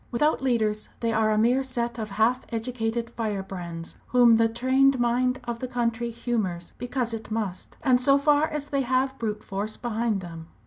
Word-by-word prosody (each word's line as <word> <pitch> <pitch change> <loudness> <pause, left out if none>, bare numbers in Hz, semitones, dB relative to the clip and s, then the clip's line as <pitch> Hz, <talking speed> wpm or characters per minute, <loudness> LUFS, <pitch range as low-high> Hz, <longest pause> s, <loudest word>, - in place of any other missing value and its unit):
Without 295 +5 +1
leaders 220 -5 0
they 230 -1 0
are 220 0 +2
a 215 - +2
mere 240 +5 +3
set 240 -3 -3
of 215 -1 -4
half 225 +5 +2
educated 230 0 -2
firebrands 190 -7 -5
whom 240 -2 +6
the 225 0 +3
trained 260 +3 +3
mind 250 +2 +1
of 235 -1 -4
the 255 - -3
country 235 -1 -1
humours 215 -7 -3
because 245 -1 -2
it 225 -1 -6
must, 215 -5 -4
and 255 -3 +4
so 275 +2 +5
far 295 +2 +3
as 295 -1 -4
they 275 -1 +1
have 260 +1 0
brute 215 -2 -3
force 205 +2 -4
behind 230 -3 -1
them. 165 -2 -9
235 Hz, 180 wpm, -26 LUFS, 215-255 Hz, -, whom